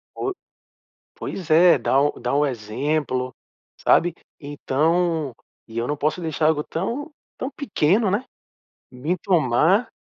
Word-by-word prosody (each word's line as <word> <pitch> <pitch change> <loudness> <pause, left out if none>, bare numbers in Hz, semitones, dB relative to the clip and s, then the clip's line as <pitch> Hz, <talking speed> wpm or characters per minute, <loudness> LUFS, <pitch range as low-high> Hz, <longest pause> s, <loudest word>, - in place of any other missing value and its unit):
Po 390 - -2 0.8
pois 180 -5 -6
é, 170 +3 +6
dá 135 - +2
o 145 +1 +1
dá 125 +2 -2
o 145 +1 +3
exemplo, 130 +2 -2 0.4
sabe. 175 -1 +3 0.3
Então 155 +1 0 0.3
e 115 +1 -6
eu 115 - -1
não 150 - -1
posso 155 +5 -1
deixar 160 -2 0
algo 150 -2 +1
tão 240 - -3 0.3
tão 260 - -3
pequeno, 210 - +1
né, 210 +7 0 0.7
me 145 +8 -2
tomar, 175 - +2
155 Hz, 130 wpm, -23 LUFS, 140-180 Hz, 0.8 s, é